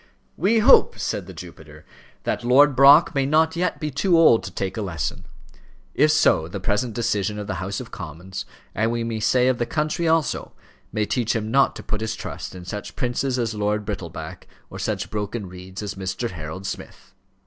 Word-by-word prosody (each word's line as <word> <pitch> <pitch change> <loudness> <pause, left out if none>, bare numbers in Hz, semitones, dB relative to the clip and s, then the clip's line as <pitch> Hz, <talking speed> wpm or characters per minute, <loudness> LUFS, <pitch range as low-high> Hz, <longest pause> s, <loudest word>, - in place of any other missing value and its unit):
"We 205 +7 +2
hope," 215 - +6
said - - -3
the - - -8
Jupiter, 75 -3 -12 0.4
"that - - -2
Lord 135 +3 +5
Brock 140 +6 +7
may 135 -2 +1
not 160 +2 +3
yet 180 0 -1
be 150 -2 -3
too 170 +6 +2
old 155 -9 +6
to 95 - -6
take 95 +1 -3
a 110 - -3
lesson. 80 -9 -4 0.7
If 150 +2 +4
so, 150 - +3
the 95 +3 -6
present 105 +5 -1
decision 105 -3 -1
of 105 - -4
the 95 -2 -4
House 95 +1 -3
of 125 - -9
Commons, 90 +2 -7 0.3
and 110 +2 +1
we 120 0 -1
may 115 -1 -3
say 125 +3 +3
of 130 -2 +1
the 120 - 0
country 155 +2 -1
also, 160 -2 0 0.4
may 105 -1 0
teach 115 +2 0
him 110 -1 -2
not 135 +2 +3
to - - -8
put 110 -3 -3
his 110 - -2
trust - - -7
in 90 -1 -9
such 105 +3 -6
princes 125 0 -1
as 115 -2 -1
Lord 105 0 -1
Brittleback, 85 -6 -6 0.2
or - - -7
such - - -3
broken 105 0 -3
reeds 90 +2 -9
as 100 - -4
Mr. 95 +4 -4
Harold 85 +3 -7
Smith." 100 - -8
110 Hz, 200 wpm, -23 LUFS, 95-135 Hz, 0.7 s, Brock